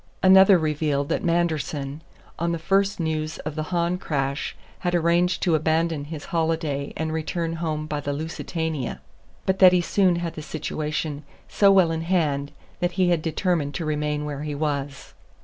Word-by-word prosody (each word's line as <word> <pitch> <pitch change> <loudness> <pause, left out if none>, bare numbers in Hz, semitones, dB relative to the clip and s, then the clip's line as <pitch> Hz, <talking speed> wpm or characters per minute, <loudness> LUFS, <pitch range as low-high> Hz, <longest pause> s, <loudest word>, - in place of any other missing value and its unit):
Another 190 0 +8
revealed 150 -3 0
that - - -1
Manderson, 155 -4 -1 0.4
on 170 0 0
the - - -1
first 195 +4 +1
news 155 -1 -2
of 150 - -5
the 155 - -3
Hahn 175 0 0
crash, 140 -4 -2 0.2
had 175 -1 0
arranged 175 +1 +2
to 175 - +2
abandon 160 -1 +1
his 150 -1 -7
holiday 160 -4 -1
and 160 0 -2
return 165 +1 -2
home 155 -2 -2
by 150 -1 -3
the 145 0 -3
Lusitania; 160 -1 -3 0.5
but 190 0 +1
that 185 -1 +8
he 180 - +4
soon 185 +1 +2
had 170 -1 -3
the 155 - -7
situation 150 -1 -3 0.3
so 200 -1 +4
well 185 -4 +5
in 160 0 -2
hand 150 -5 0 0.3
that 175 0 0
he 180 0 +2
had 170 -3 +2
determined 160 -2 -1
to 165 - -3
remain 150 -1 -1
where 145 -1 -4
he 150 -1 -4
was. 140 -2 -3
160 Hz, 170 wpm, -24 LUFS, 150-175 Hz, 0.5 s, Another